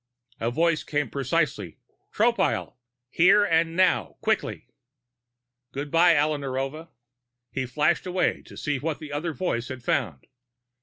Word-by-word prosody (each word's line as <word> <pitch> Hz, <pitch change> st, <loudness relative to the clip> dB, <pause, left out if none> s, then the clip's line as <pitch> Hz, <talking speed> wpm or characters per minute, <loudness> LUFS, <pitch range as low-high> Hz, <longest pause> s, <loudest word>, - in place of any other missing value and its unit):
A 115 Hz, -, 0 dB
voice 165 Hz, +5 st, +1 dB
came 145 Hz, -5 st, -2 dB
piercingly: 135 Hz, -, -1 dB, 0.3 s
"Tropile! -, -, +1 dB, 0.4 s
Here 200 Hz, +4 st, +5 dB, 0.2 s
now, 175 Hz, +2 st, +1 dB
quickly!" -, -, -1 dB, 1.0 s
Good 145 Hz, +1 st, -5 dB
by, 170 Hz, 0 st, +5 dB
Alla 150 Hz, 0 st, +1 dB
Narova! 135 Hz, +4 st, -4 dB, 0.6 s
He 130 Hz, -1 st, -3 dB
flashed 155 Hz, +7 st, +1 dB
away 180 Hz, -1 st, 0 dB
to -, -, -12 dB
see 145 Hz, -2 st, -2 dB
what 155 Hz, +1 st, -2 dB
the 155 Hz, -2 st, -9 dB
other 160 Hz, +3 st, -2 dB
voice 120 Hz, -10 st, -2 dB
had 130 Hz, -2 st, -7 dB
found. 70 Hz, -, -1 dB
150 Hz, 125 wpm, -25 LUFS, 135-170 Hz, 1.0 s, Here